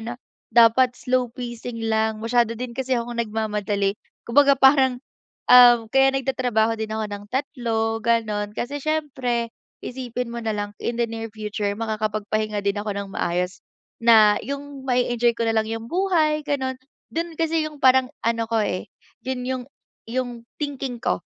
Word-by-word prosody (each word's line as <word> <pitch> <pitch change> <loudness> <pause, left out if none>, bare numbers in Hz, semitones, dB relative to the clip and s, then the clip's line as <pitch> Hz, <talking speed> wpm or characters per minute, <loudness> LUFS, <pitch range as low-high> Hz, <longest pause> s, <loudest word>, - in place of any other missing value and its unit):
na 235 +2 -5 0.4
dapat 240 +2 +5
slow 255 0 0
pacing 240 -2 -6
lang. 220 0 0
Masyado 230 0 +2
din 245 +1 -5
kasi 260 +1 -1
akong 235 0 -3
nagmamadali. 210 -2 -1 0.3
Kumbaga 280 +3 +5
parang, 265 -1 +4 0.5
um, 240 -3 +8
kaya 270 +1 +4
nagtatrabaho 245 -4 0
din 220 0 -3
ako 220 0 -2
ng 205 0 -6
3, 230 -4 -1
gano'n, 215 -3 0
kasi 280 +6 -3
siyempre, 265 -6 -1 0.3
isipin 245 -1 -4
mo 235 - -4
na 220 -2 -2
lang 205 0 -3
in 235 - -2
the 240 - +2
near 225 0 -5
future 210 -1 -4
makakapagpahinga 215 -1 -2
din 200 +1 0
ako 210 0 -4
nang 200 -1 -5
maayos. 180 +2 -2 0.4
Na 215 -3 +6
'yung 280 0 -7
mae-enjoy 240 -2 +2
ko 230 - -1
na 225 - +1
lang 220 0 +1
'yung 225 0 -4
buhay, 335 -5 +2
gano'n. 265 -2 -1 0.4
Do'n 335 0 -3
kasi 325 -1 +1
'yung 305 -1 -9
parang 260 0 +5 0.2
ano 230 0 0
ko 225 -1 +1
eh, 185 - -3 0.4
yun 255 -1 -3
'yung 255 0 -2 0.5
'yung 250 +1 -2 0.3
thinking 275 -4 -4
ko, 90 - 0
235 Hz, 155 wpm, -23 LUFS, 220-260 Hz, 0.5 s, um